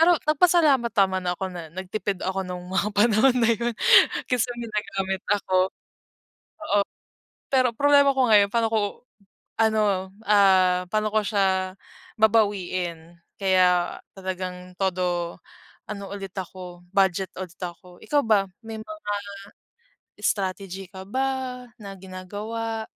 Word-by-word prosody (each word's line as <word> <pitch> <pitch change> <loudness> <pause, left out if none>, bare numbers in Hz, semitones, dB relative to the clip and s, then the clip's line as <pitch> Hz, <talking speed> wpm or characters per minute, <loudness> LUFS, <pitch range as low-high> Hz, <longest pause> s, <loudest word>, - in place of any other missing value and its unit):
pero, 340 +1 +6
nagpasalamat 305 -6 +4
naman 190 -2 +2
ako 180 +2 -2
na, 170 -3 -7
nagtipid 190 0 -3
ako 190 +1 -1
no'ng, 180 -1 -7
mga 195 +2 +1
panahon 235 +4 +4
na 230 - +3
'yon. 235 +2 -1 0.6
Kasi 250 -1 +1
may 235 - -5
nagamit 195 -3 -2
ako. 185 -2 +2 1.0
Oo, 205 -9 +2 0.7
pero 255 -2 +3
problema 285 +1 +5
ko 260 -2 +3
ngayon 205 -2 +5
pa'no 230 -1 +2
ko, 220 - +2 0.8
ano, 205 -4 +1 0.2
ah, 190 -3 +5
pa'no 215 0 +1
ko 215 - +3
siya, 190 -2 +1 0.4
babawiin. 185 -6 +1 0.2
Kaya, 185 -2 +3 0.2
talagang 185 -1 -6
todo, 180 -2 -1 0.5
ano 200 -2 -6
ulit 195 -2 -6
ako, 180 -1 -9
budget 190 -1 +2
ulit 185 -2 -8
ako. 175 0 -8
Ikaw 290 -1 +2
ba, 205 -3 +4 0.2
may 220 -1 -6
mga, 315 +6 -10 1.2
strategy 195 -1 -2
ka 190 -1 -9
ba, 260 +1 -2 0.2
na 195 -1 -7
ginagawa? 210 +4 -5
195 Hz, 125 wpm, -25 LUFS, 185-225 Hz, 1.2 s, pero